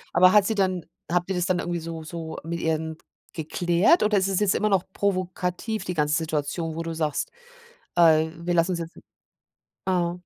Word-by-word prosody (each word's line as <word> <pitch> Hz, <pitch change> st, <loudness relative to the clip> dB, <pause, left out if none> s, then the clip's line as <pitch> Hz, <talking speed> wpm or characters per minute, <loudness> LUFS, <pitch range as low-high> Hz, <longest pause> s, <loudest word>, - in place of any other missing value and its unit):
Aber 185 Hz, +1 st, +7 dB
hat 205 Hz, -1 st, +5 dB
sie 220 Hz, -, 0 dB
dann 185 Hz, -4 st, 0 dB, 0.3 s
habt 180 Hz, +1 st, +1 dB
ihr 190 Hz, -, 0 dB
das 180 Hz, +2 st, 0 dB
dann 185 Hz, -1 st, +1 dB
irgendwie 175 Hz, -1 st, -2 dB
so 165 Hz, 0 st, -6 dB
so 160 Hz, 0 st, -6 dB
mit 170 Hz, +1 st, -4 dB
ihr 160 Hz, -1 st, +1 dB
denn 160 Hz, 0 st, -6 dB, 0.4 s
geklärt 175 Hz, -, +2 dB
oder 210 Hz, -1 st, +3 dB
ist 190 Hz, 0 st, +2 dB
es 195 Hz, 0 st, +1 dB
jetzt 205 Hz, -2 st, +3 dB
immer 215 Hz, -, +1 dB
noch 190 Hz, -3 st, +3 dB
provokativ 185 Hz, +2 st, -2 dB
die 180 Hz, -, -3 dB
ganze 150 Hz, 0 st, +2 dB
Situation, 160 Hz, 0 st, -2 dB
wo 165 Hz, -, -3 dB
du 165 Hz, 0 st, -4 dB
sagst: 155 Hz, -2 st, -2 dB, 0.6 s
„Äh, 160 Hz, -2 st, +5 dB, 0.2 s
wir 175 Hz, -, +1 dB
lassen 170 Hz, +2 st, +3 dB
uns 170 Hz, -, -3 dB
jetzt“ 165 Hz, 0 st, -7 dB, 0.9 s
ah. 175 Hz, -2 st, 0 dB
175 Hz, 200 wpm, -25 LUFS, 160-185 Hz, 0.9 s, Aber